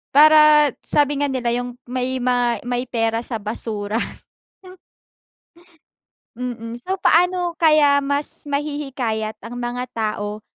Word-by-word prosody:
Para 305 -1 +7
sabi 290 -1 +1
nga 285 - +1
nila 250 -3 -1
yung 245 0 -6
may 255 0 -3
ma 245 -1 +2
may 245 +1 -3
pera 225 -1 0
sa 235 0 -5
basura. 215 0 -3 2.4
Mm, 235 -1 -6
so 370 +11 -4
paano 355 0 +2
kaya 300 -4 +4
mas 285 +1 -1
mahihikayat 275 -7 -3
ang 230 +1 -9
mga 245 +1 -4
tao 210 -1 -3
250 Hz, 115 wpm, -21 LUFS, 230-290 Hz, 2.4 s, Para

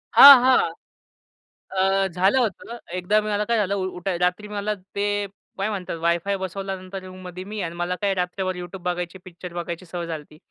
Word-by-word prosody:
हां, 275 -2 +12
हां. 255 0 +4 1.0
अ, 195 0 +2
झालं 190 +6 +2
होतं. 235 0 -2 0.2
एकदा 190 +4 +2
मी 215 - -4
मला 210 0 +1
काय 235 +2 +1
झालं 200 -2 +1
उठाय 185 -1 -2
रात्री 180 +4 0
मला 210 0 -2 0.2
ते 205 0 0 0.3
काय 195 +2 -1
म्हणतात 190 -5 -4
वायफाय 170 +4 +1
बसवल्यानंतर 190 0 -5
रूममध्ये 185 -1 -8
मी 210 +3 -7
आहे. - - -1
आणि 165 +1 -6
मला 175 +1 -1
काय 200 -1 +2
रात्रभर 185 0 -2
YouTube 180 +1 -8
बघायची, 180 0 -3
पिक्चर 180 -1 -9
बघायची 175 +1 -5
सवय 175 0 -5
झाली 160 -2 -4
होती. 150 +1 -18
185 Hz, 185 wpm, -24 LUFS, 180-200 Hz, 1.0 s, हां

